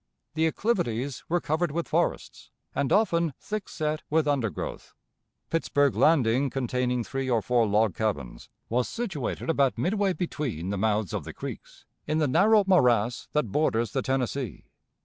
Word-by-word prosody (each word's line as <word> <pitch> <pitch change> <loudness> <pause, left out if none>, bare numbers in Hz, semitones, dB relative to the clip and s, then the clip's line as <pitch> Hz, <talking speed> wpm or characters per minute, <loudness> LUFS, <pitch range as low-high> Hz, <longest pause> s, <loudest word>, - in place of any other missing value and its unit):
The 160 +1 +2
acclivities 140 - -1
were 175 +1 +2
covered 160 +1 -1
with 170 +2 -2
forests, - - -2 0.2
and 140 -2 -1
often 170 - +2
thick 215 -1 -5
set 155 -1 -2
with 155 0 +2
undergrowth. 125 - -2 0.6
Pittsburg 145 -4 +2
Landing, 135 -3 +3
containing 125 -1 -1
three 135 +2 -3
or 120 -2 +3
four 120 +1 +2
log 105 -1 +2
cabins, 80 - -3 0.2
was 125 +2 0
situated 190 - -4
about 140 -6 +2
midway 195 - +1
between 135 - -3
the - - -1
mouths 105 -3 0
of - - -2
the - - -8
creeks, - - -9 0.2
in 155 - 0
the 155 -2 +2
narrow 210 +10 +5
morass 125 - +3
that 150 -9 0
borders 115 -7 +1
the 135 - 0
Tennessee. 130 - -2
135 Hz, 150 wpm, -27 LUFS, 115-160 Hz, 0.6 s, narrow